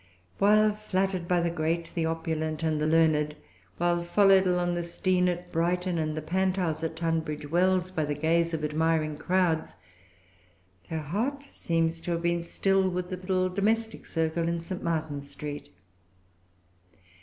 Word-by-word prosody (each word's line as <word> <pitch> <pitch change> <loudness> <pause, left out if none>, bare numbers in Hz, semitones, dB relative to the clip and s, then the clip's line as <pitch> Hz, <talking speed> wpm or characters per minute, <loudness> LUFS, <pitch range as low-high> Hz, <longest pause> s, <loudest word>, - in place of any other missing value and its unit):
While 215 +1 +5
flattered 190 -4 -1
by 175 -1 +2
the 170 0 0
great, 165 0 -1
the 165 -2 0
opulent, 160 -1 -2
and 155 -2 0
the 155 - +1
learned, 155 -2 +3 0.4
while 175 0 +1
followed 195 +1 +5
along 180 -1 +1
the 175 - -1
Steyne 180 +1 +1
at 175 0 -4
Brighton, 175 +1 0
and 155 -1 -2
the 155 - -3
Pantiles 180 -2 0
at 160 0 -2
Tunbridge 160 -3 -2
Wells, 185 +1 +2
by 160 -4 -1
the 145 0 -2
gaze 165 +3 +1
of 160 -2 -3
admiring 155 0 +1
crowds, 170 +1 0 1.1
her 160 -1 -2
heart 245 - -2
seems 165 0 0
to 175 - -4
have 170 0 -3
been 170 0 +1
still 190 +2 +1
with 180 0 -3
the 185 - -3
little 185 0 0
domestic 220 +4 -1
circle 165 0 -1
in 170 0 -1
St. 180 +2 -6
Martin's 155 -4 -3
Street. 145 +1 -7
170 Hz, 155 wpm, -28 LUFS, 160-185 Hz, 1.1 s, While